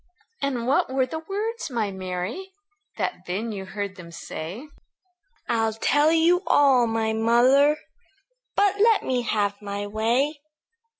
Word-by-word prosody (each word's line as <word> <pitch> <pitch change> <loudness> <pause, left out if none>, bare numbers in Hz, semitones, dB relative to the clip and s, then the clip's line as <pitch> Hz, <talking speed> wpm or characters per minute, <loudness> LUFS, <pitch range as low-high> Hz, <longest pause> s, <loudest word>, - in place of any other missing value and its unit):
"And 260 -4 -1
what 260 0 +1
were 265 -1 +2
the 320 +5 -5
words, 420 +5 -4
my 225 -5 -1
Mary, 190 - -5 0.4
That 180 - -3
then 210 +6 -3
you 195 -2 -6
heard 200 -1 -5
them 170 -2 -10
say?" 170 - -7 0.8
"I'll 225 -2 +1
tell 290 +7 +2
you 335 +2 +4
all, 265 -4 +5
my 225 -1 0
mother; 250 +6 +4 0.8
But 405 0 +2
let 445 0 +4
me 255 -1 0
have 205 -3 -1
my 200 0 -4
way. 240 +8 0
235 Hz, 135 wpm, -24 LUFS, 205-295 Hz, 0.8 s, all